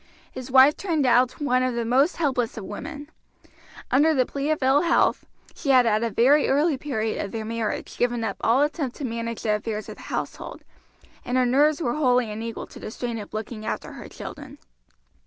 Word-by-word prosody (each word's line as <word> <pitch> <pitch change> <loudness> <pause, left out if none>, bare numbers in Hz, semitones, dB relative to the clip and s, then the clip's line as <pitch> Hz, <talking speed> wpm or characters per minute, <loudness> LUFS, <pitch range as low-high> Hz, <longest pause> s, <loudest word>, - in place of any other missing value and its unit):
His 255 0 -8
wife 265 +3 +6
turned 325 -7 -1
out 250 0 +3
one 255 -4 +1
of 255 -1 0
the 235 -1 -1
most 270 +8 +2
helpless 255 -8 -1
of 215 - -5
women. 290 +9 -8 0.8
Under 305 +4 +4
the 255 -2 +3
plea 280 +3 -3
of 310 -3 0
ill 270 +3 +4
health 340 - +2 0.3
she 290 - -5
had 255 -2 +6
at 215 -1 +2
a 230 - 0
very 270 +7 +3
early 295 +3 +2
period 225 -6 -2
of 200 - -6
their 220 -1 -4
marriage 225 -1 -4
given 240 -1 0
up 200 -3 -3
all 250 +5 +3
attempt 295 -4 -2
to 285 - -5
manage 230 -1 -4
the 215 - +1
affairs 215 0 -5
of - - -9
the - - -13
household, - - -5 0.6
and 250 +1 -1
her 255 - +3
nerves 290 +5 +3
were 240 - 0
wholly 250 -6 +2
unequal 225 +2 -5
to - - -13
the - - -7
strain 235 +1 -4
of 205 - -9
looking 215 0 -6
after 220 - -4
her - - -10
children. - - -9
250 Hz, 205 wpm, -24 LUFS, 230-285 Hz, 0.8 s, wife